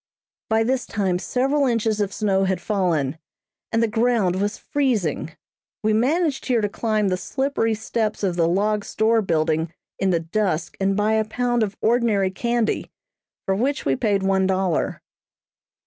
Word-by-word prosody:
By 220 0 +3
this 255 +2 -1
time 190 -3 0
several 270 +9 +1
inches 225 -3 +1
of 200 -1 -1
snow 195 -2 +1
had 190 -1 0
fallen, 170 -8 0 0.5
and 225 0 +2
the - - +3
ground 225 -4 +1
was 205 +1 -1
freezing. 215 - -1 0.5
We 215 0 +2
managed 285 +6 +1
here 245 -2 +2
to 210 - +1
climb 215 -1 0
the 185 - 0
slippery 265 -1 -1
steps 220 -1 -2
of 185 -3 +1
the 165 -1 +2
log 205 +4 +1
store 220 +2 +2
building 160 -3 0 0.3
in 195 - +1
the 170 -2 +2
dusk 170 -1 -1
and 195 0 +1
buy 210 +1 +2
a 220 0 +2
pound 240 +2 0
of 205 -2 -1
ordinary 220 -5 +2
candy, 235 +2 -1 0.6
for 195 - +1
which 260 +8 -1
we 135 - +2
paid 200 - 0
one 190 0 +2
dollar. 190 -3 0
210 Hz, 165 wpm, -23 LUFS, 190-230 Hz, 0.6 s, By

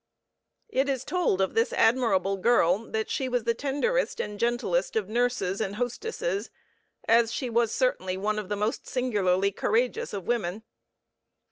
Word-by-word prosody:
It 275 -7 +1
is 265 -2 -1
told 325 - +1
of 190 - 0
this 230 +1 +2
admirable 210 -5 +2
girl 200 -1 +2
that 220 0 -2
she 260 -1 -2
was 245 -2 0
the 235 +1 +1
tenderest 290 - -1
and 210 -1 -4
gentlest 240 - 0
of 215 -4 0
nurses 225 -4 0
and 200 -1 -2
hostesses, 400 - -3 0.6
as 230 0 +4
she 245 0 -3
was 230 -1 +2
certainly 190 -8 0
one 215 +2 -1
of 205 -2 -7
the 205 - 0
most 210 +3 -2
singularly 200 -6 +1
courageous 230 +5 0
of 195 -3 -5
women. 215 -3 -1
230 Hz, 155 wpm, -27 LUFS, 200-250 Hz, 0.6 s, as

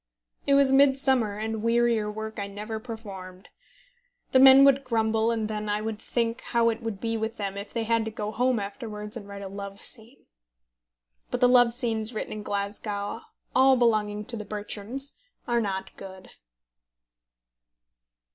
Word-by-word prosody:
It 280 - +5
was 275 -1 +4
midsummer, 265 -5 +3
and 220 0 -3
wearier 230 -2 +2
work 220 0 -6
I 200 - -3
never 210 +2 -6
performed. 195 -5 -9 0.8
The 260 - +5
men 265 +1 +9
would 275 0 +4
grumble, 225 -2 +1
and 225 -2 -1
then 215 -1 -4
I 205 0 0
would 215 0 -4
think 230 0 -2
how 235 -1 +2
it 225 - -6
would 225 -4 -4
be 225 +1 -2
with 220 +1 -3
them 200 -2 -3
if 200 +1 -7
they 230 - -2
had 230 0 +1
to - - -3
go 210 -1 -5
home 250 +1 +1
afterwards 210 +1 -6
and 210 -4 -8
write 200 0 -8
a - - -5
love 200 0 -8
scene. 230 +2 -8 1.1
But - - -2
the 250 - +5
love 245 -1 +5
scenes 225 -2 +3
written - - -4
in 215 - -6
Glasgow, 205 +1 -4 0.3
all 265 0 +6
belonging 210 -3 +1
to 245 - -4
The 215 - -5
Bertrams, 215 +6 -5 0.3
are 235 -1 +2
not 195 -3 -4
good. 190 -1 -11
220 Hz, 165 wpm, -26 LUFS, 210-240 Hz, 1.1 s, men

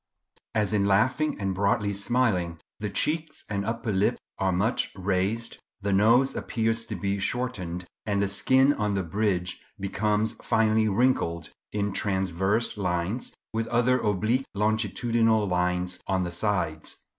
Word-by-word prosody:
As 105 -1 +1
in 100 -1 +2
laughing 130 +10 +2
and 95 -1 -1
broadly 100 +1 +1
smiling 100 -5 +1 0.2
the 105 - -2
cheeks 155 +9 -1
and 100 -2 -2
upper 115 +1 -2
lip 95 +1 +2 0.2
are 95 -1 +2
much 100 +7 +1
raised, 100 +4 -1 0.2
the 100 0 0
nose 115 +7 +4
appears 115 -1 -1
to 110 - -5
be 100 +2 -1
shortened, 95 -7 -3 0.2
and 100 -1 +1
the 100 - +2
skin 130 +8 +4
on 105 -5 -1
the 95 - 0
bridge 90 0 -1 0.2
becomes 105 +3 0
finely 110 0 +2
wrinkled 95 - +1 0.2
in 100 -1 -1
transverse 95 +3 0
lines, 90 +5 -2 0.2
with 115 0 -1
other 120 +2 +3
oblique 110 +5 0
longitudinal 110 +1 +1
lines 90 0 0
on 95 -1 +1
the 85 - -3
sides. 85 -4 -2
105 Hz, 140 wpm, -27 LUFS, 95-115 Hz, 0.2 s, nose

